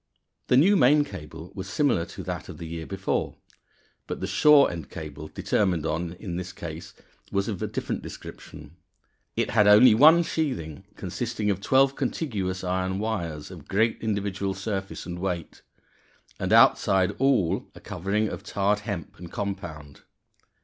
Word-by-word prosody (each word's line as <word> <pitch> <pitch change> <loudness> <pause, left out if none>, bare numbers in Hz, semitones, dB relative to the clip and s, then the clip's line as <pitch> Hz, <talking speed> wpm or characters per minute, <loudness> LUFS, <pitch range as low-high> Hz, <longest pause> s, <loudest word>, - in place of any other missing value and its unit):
_ - - -47
The 125 - +4
new 190 +9 +6
main 145 -1 +5
cable 80 - -9
was 95 -1 -6
similar 105 - +1
to - - -8
that - - -5
of - - -8
the 85 - -7
year 80 0 -6
before, 95 0 -2 0.7
but - - -4
the - - -3
shore 140 +9 +5
end 80 -6 -7
cable 75 0 -8
determined 90 -2 0
on 85 +2 -2
in 90 -1 -6
this 90 0 -5
case 80 0 -8 0.4
was 100 0 0
of 100 -5 -4
a - - -1
different - - -3
description. 85 - -11 0.6
It - - 0
had 105 -1 +4
only 105 +3 +8
one 160 +9 +7
sheathing, 125 - -3
consisting 105 -1 -2
of 100 -1 -3
twelve 135 +5 +3
contiguous 105 - -2
iron 95 +1 -1
wires 85 -8 -3
of - - -11
great 110 +3 +1
individual 100 -3 -2
surface 95 0 -4
and 85 0 -6
weight; 90 -3 -4 0.8
and - - -2
outside 95 +1 +5
all 130 -11 +2
a - - -11
covering 100 +5 -1
of - - -6
tarred 100 +1 0
hemp 100 -7 -6
and 85 -1 -9
compound. 85 -8 -6
95 Hz, 160 wpm, -26 LUFS, 85-110 Hz, 0.8 s, only